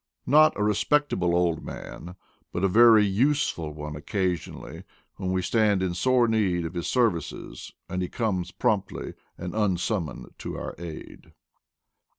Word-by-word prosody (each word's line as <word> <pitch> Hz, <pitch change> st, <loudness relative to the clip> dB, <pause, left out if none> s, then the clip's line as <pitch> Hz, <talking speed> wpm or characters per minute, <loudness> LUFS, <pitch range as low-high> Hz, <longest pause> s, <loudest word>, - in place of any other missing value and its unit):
Not 155 Hz, +2 st, +5 dB
a -, -, +2 dB
respectable 105 Hz, -3 st, +1 dB
Old 85 Hz, -2 st, +1 dB
Man, 90 Hz, +2 st, -8 dB, 0.4 s
but 90 Hz, -, -3 dB
a -, -, +5 dB
very 110 Hz, +1 st, +7 dB
useful 100 Hz, -, 0 dB
ona 75 Hz, -1 st, -6 dB
occasionally, 90 Hz, +1 st, -3 dB, 0.3 s
when 95 Hz, -2 st, -2 dB
we 95 Hz, 0 st, 0 dB
stand 105 Hz, -4 st, +2 dB
in 90 Hz, -2 st, -1 dB
sore 125 Hz, +6 st, +3 dB
need 95 Hz, -6 st, +1 dB
of 80 Hz, -, -5 dB
his 85 Hz, -1 st, -3 dB
services 90 Hz, -, -1 dB, 0.2 s
and 90 Hz, -, -3 dB
he 90 Hz, -, -2 dB
comes 95 Hz, -7 st, -1 dB
promptly 105 Hz, -3 st, -1 dB, 0.2 s
and 90 Hz, 0 st, -6 dB
unsummoned 95 Hz, -4 st, -1 dB
to -, -, -5 dB
our -, -, -5 dB
aid. 85 Hz, -2 st, -9 dB
95 Hz, 145 wpm, -26 LUFS, 85-110 Hz, 0.4 s, very